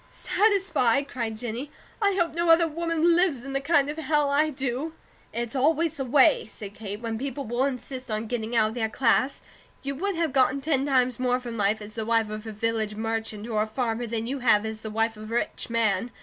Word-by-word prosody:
"Satisfy?" 350 Hz, -, +2 dB
cried 235 Hz, -5 st, -4 dB
Jennie. 240 Hz, +5 st, -5 dB, 0.3 s
"I 400 Hz, -2 st, +3 dB
hope 345 Hz, -4 st, +1 dB
no 340 Hz, +1 st, 0 dB
other 330 Hz, 0 st, +6 dB
woman 330 Hz, +1 st, +1 dB
lives 340 Hz, -9 st, +2 dB
in 275 Hz, 0 st, -6 dB
the 275 Hz, -, 0 dB
kind 285 Hz, -1 st, +3 dB
of 295 Hz, +2 st, -4 dB
Hell 300 Hz, -2 st, +1 dB
I 300 Hz, +2 st, +3 dB
do." 270 Hz, +2 st, -3 dB, 0.4 s
"It's 235 Hz, +2 st, -3 dB
always 315 Hz, +4 st, +2 dB
the 270 Hz, -, -2 dB
way," 270 Hz, -1 st, +4 dB
said 200 Hz, -2 st, -9 dB
Kate, 205 Hz, -1 st, -6 dB
"when 225 Hz, -1 st, -3 dB
people 275 Hz, +1 st, -4 dB
will 240 Hz, +4 st, 0 dB
insist 255 Hz, -1 st, -4 dB
on 215 Hz, +1 st, -2 dB
getting 230 Hz, 0 st, -3 dB
out 215 Hz, -2 st, +4 dB
of -, -, -7 dB
their 225 Hz, -2 st, -1 dB
class. 255 Hz, +3 st, +1 dB, 0.4 s
You 275 Hz, 0 st, -2 dB
would 385 Hz, +7 st, -2 dB
have 330 Hz, -4 st, -1 dB
gotten 265 Hz, 0 st, +3 dB
ten 275 Hz, -1 st, 0 dB
times 255 Hz, -3 st, +2 dB
more 250 Hz, 0 st, +1 dB
from 240 Hz, -2 st, -7 dB
life 210 Hz, 0 st, +1 dB
as 210 Hz, +1 st, -7 dB
the 225 Hz, -, -3 dB
wife 225 Hz, -1 st, +1 dB
of 215 Hz, +1 st, -6 dB
a -, -, -4 dB
village 220 Hz, 0 st, -1 dB
merchant, 225 Hz, -1 st, -3 dB
or 215 Hz, -2 st, 0 dB
a 215 Hz, -, 0 dB
farmer, 235 Hz, 0 st, -2 dB
than 225 Hz, 0 st, -2 dB
you 270 Hz, +3 st, -3 dB
have 220 Hz, -4 st, +4 dB
as 220 Hz, 0 st, -5 dB
the 220 Hz, -, -5 dB
wife 225 Hz, +1 st, 0 dB
of 215 Hz, +1 st, -9 dB
a -, -, -1 dB
rich 240 Hz, -, -2 dB
man. 230 Hz, -1 st, +1 dB
250 Hz, 225 wpm, -26 LUFS, 225-285 Hz, 0.4 s, other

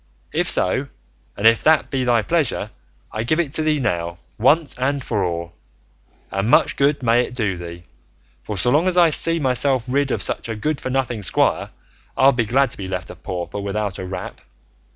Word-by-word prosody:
If -, -, +1 dB
so, -, -, +1 dB, 0.5 s
and 100 Hz, -, -3 dB
if 115 Hz, 0 st, +5 dB
that 155 Hz, -1 st, +3 dB
be 135 Hz, -2 st, 0 dB
thy 120 Hz, -3 st, +2 dB
pleasure, 140 Hz, -8 st, 0 dB, 0.4 s
I 110 Hz, -, -3 dB
give 155 Hz, +8 st, +1 dB
it 150 Hz, -5 st, -1 dB
to 160 Hz, -, +1 dB
thee 155 Hz, -1 st, +1 dB
now, 85 Hz, -8 st, -2 dB, 0.2 s
once 145 Hz, +4 st, +3 dB
and 140 Hz, +1 st, 0 dB
for 105 Hz, -6 st, -1 dB
all, 85 Hz, -1 st, -3 dB, 0.8 s
and 95 Hz, +3 st, -1 dB
much -, -, +4 dB
good 140 Hz, -1 st, +1 dB
may 120 Hz, +1 st, +4 dB
it 125 Hz, -, -5 dB
do 105 Hz, -6 st, -1 dB
thee, 85 Hz, 0 st, -9 dB, 0.6 s
for 105 Hz, +9 st, -6 dB
so 120 Hz, +7 st, +3 dB
long 155 Hz, +6 st, +3 dB
as 180 Hz, -1 st, +1 dB
I 170 Hz, -2 st, +6 dB
see 165 Hz, +2 st, +2 dB
myself 130 Hz, -2 st, +1 dB
rid 140 Hz, +2 st, +1 dB
of -, -, -1 dB
such -, -, -3 dB
a 110 Hz, -, -3 dB
good 140 Hz, +7 st, -2 dB
for -, -, -4 dB
nothing 125 Hz, -4 st, -1 dB
squire 95 Hz, -, +1 dB, 0.5 s
I'll 135 Hz, +1 st, +6 dB
be 120 Hz, -3 st, 0 dB
glad 135 Hz, +2 st, +2 dB
to -, -, -10 dB
be 95 Hz, -, -6 dB
left 90 Hz, -1 st, -5 dB
a -, -, -10 dB
pauper 90 Hz, +3 st, -5 dB
without 100 Hz, -1 st, -3 dB
a 95 Hz, -, -5 dB
rap. 95 Hz, -, -7 dB
120 Hz, 205 wpm, -21 LUFS, 100-140 Hz, 0.8 s, I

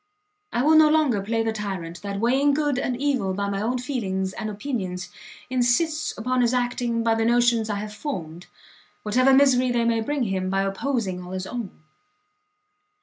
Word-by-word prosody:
I 240 Hz, -, 0 dB
will 310 Hz, +2 st, +5 dB
no 310 Hz, -1 st, +7 dB
longer 300 Hz, -9 st, +2 dB
play 225 Hz, +3 st, -1 dB
the 225 Hz, 0 st, -1 dB
tyrant 190 Hz, -5 st, -5 dB
that, 200 Hz, 0 st, -4 dB
weighing 270 Hz, +5 st, +3 dB
good 290 Hz, -3 st, 0 dB
and 250 Hz, -2 st, -2 dB
evil 260 Hz, -9 st, 0 dB
by 200 Hz, +1 st, -2 dB
my 200 Hz, 0 st, -2 dB
own 240 Hz, +4 st, 0 dB
feelings 195 Hz, -8 st, -3 dB
and 215 Hz, -2 st, -4 dB
opinions, 200 Hz, -5 st, -4 dB, 0.4 s
insists 255 Hz, +6 st, 0 dB
upon 250 Hz, +3 st, 0 dB
his 240 Hz, +1 st, +2 dB
acting 245 Hz, -1 st, -1 dB
by 230 Hz, -1 st, +3 dB
the 225 Hz, 0 st, 0 dB
notions 235 Hz, -1 st, +2 dB
I 205 Hz, -, -1 dB
have 210 Hz, +1 st, -5 dB
formed, 180 Hz, -, -6 dB, 0.6 s
whatever 255 Hz, +5 st, +3 dB
misery 265 Hz, -2 st, +4 dB
they 240 Hz, -1 st, +1 dB
may 230 Hz, -1 st, +1 dB
bring 285 Hz, +4 st, -1 dB
him 190 Hz, -3 st, -1 dB
by 195 Hz, +1 st, +1 dB
opposing 195 Hz, -2 st, -2 dB
all 180 Hz, +1 st, -8 dB
his 185 Hz, 0 st, -4 dB
own. 215 Hz, -8 st, -7 dB
230 Hz, 180 wpm, -24 LUFS, 200-255 Hz, 0.6 s, no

